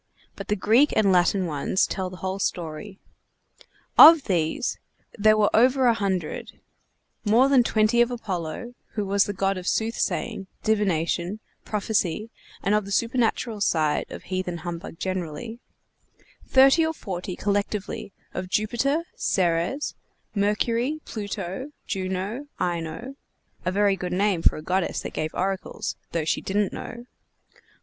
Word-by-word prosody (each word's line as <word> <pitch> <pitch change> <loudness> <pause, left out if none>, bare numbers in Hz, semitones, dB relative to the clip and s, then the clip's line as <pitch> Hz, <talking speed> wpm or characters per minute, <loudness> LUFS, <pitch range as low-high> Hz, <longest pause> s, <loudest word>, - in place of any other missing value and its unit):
But - - -8
the 210 - +1
Greek 225 +8 +4
and 200 -3 +4
Latin 185 +1 +3
ones 155 +3 +1
tell 185 -1 -3
the 185 - -10
whole 190 +1 -2
story. 175 +2 -3 1.0
Of 320 -2 +11
these 170 +3 -1 0.4
there 215 0 +4
were 210 -1 +3
over 255 +3 +4
a 240 - +6
hundred; 190 -7 -3 0.6
more 230 +5 +5
than 275 -2 +5
twenty 230 0 +3
of 240 - +3
Apollo, 215 -1 -4 0.2
who 210 -2 -2
was 200 +1 +3
the - - -2
god 195 0 0
of 180 - -8
soothsaying, 220 -2 -1 0.2
divination, 190 -2 0 0.3
prophecy, 210 -1 -1 0.3
and 200 - +2
of 210 -1 +2
the 200 - -8
supernatural 230 -1 0
side 155 -6 +1
of - - -8
heathen 185 -2 -3
humbug 170 -1 -6
generally; 185 +5 -4 0.9
thirty 270 +5 +6
or 320 0 0
forty 185 - -5
collectively 205 0 -2 0.2
of 185 - -4
Jupiter, 240 - +1
Ceres, 175 - 0 0.4
Mercury, 230 +7 0
Pluto, 205 +5 -5
Juno, 190 +8 -3
Ino 175 +9 -3 0.5
(a 180 - +1
very 200 0 +3
good 180 -2 -4
name 195 -2 +1
for - - +4
a 155 - -8
goddess 185 +1 0
that - - -6
gave 155 0 -3
oracles, 190 0 -2 0.2
though 165 -2 -1
she - - 0
didn't 200 +1 0
know!) 240 0 -7
200 Hz, 140 wpm, -25 LUFS, 180-230 Hz, 1.0 s, Of